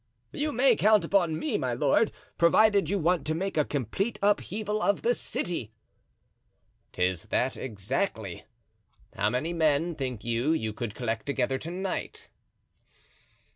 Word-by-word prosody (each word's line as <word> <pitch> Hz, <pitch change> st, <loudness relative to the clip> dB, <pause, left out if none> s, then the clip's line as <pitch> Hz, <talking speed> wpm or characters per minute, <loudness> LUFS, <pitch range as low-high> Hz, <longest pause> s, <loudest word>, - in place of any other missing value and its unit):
"You 300 Hz, +1 st, -1 dB
may 250 Hz, -1 st, +4 dB
count 210 Hz, -4 st, +4 dB
upon 170 Hz, -4 st, +2 dB
me, 255 Hz, -, -1 dB
my 125 Hz, -2 st, -1 dB
lord, 145 Hz, -, +2 dB, 0.3 s
provided 200 Hz, +1 st, +4 dB
you 200 Hz, -, +1 dB
want 175 Hz, 0 st, +1 dB
to 155 Hz, -, 0 dB
make 195 Hz, +4 st, -2 dB
a 155 Hz, -, +3 dB
complete 145 Hz, -, -2 dB
upheaval 210 Hz, +1 st, 0 dB
of 200 Hz, -, +1 dB
the 240 Hz, -, +3 dB
city." 165 Hz, -, -3 dB, 1.2 s
"'Tis 90 Hz, -1 st, -1 dB
that 130 Hz, +1 st, 0 dB
exactly. 110 Hz, -, -3 dB, 0.7 s
How 105 Hz, -1 st, +1 dB
many 130 Hz, +9 st, -1 dB
men, 160 Hz, 0 st, +2 dB
think 130 Hz, -7 st, -4 dB
you, 120 Hz, +6 st, +1 dB
you 110 Hz, -9 st, -2 dB
could 110 Hz, -1 st, -5 dB
collect 115 Hz, -1 st, -3 dB
together 135 Hz, -1 st, 0 dB
to 160 Hz, -, -6 dB
night?" 185 Hz, +2 st, -4 dB
160 Hz, 140 wpm, -28 LUFS, 120-200 Hz, 1.2 s, may